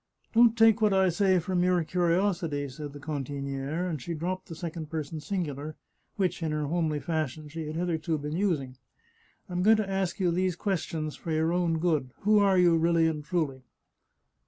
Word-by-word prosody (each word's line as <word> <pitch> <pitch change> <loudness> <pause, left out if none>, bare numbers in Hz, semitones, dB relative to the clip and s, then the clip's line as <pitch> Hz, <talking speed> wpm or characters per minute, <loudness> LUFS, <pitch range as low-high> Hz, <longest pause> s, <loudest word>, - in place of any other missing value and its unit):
" - - -41
Don't 230 0 +5
take 225 -1 +5
what 210 -2 +4
I 190 -1 +4
say 185 +2 +3
for 180 +2 -2
mere 180 -1 +2
curiosity," 170 -3 0
said 145 +2 -7
the 145 - -9
cantiniere, 140 +2 -3
and 155 -6 -3
she 170 +5 -4
dropped 185 +4 -3
the 165 - -7
second 160 -2 -6
person 155 0 -4
singular, 155 -4 -4 0.4
which, 185 -3 -1
in 160 -1 -1
her 150 -1 -1
homely 155 -1 0
fashion, 155 -2 -3
she 160 +1 -6
had 155 - -5
hitherto 165 -1 -1
been 150 +1 -4
using. 155 -10 -1 0.4
" - - -36
I'm 180 -1 -2
going 220 +3 +6
to 215 -2 -1
ask 195 -1 -2
you 180 -3 +2
these 180 0 0
questions 165 -5 -2
for - - -9
your 160 +1 +1
own 175 -2 +1
good. 155 -6 0
Who 210 +1 +4
are 195 -2 +4
you, 175 -2 +5
really 165 0 +3
and 155 -2 -1
truly 150 -6 -2
165 Hz, 195 wpm, -28 LUFS, 150-185 Hz, 0.4 s, going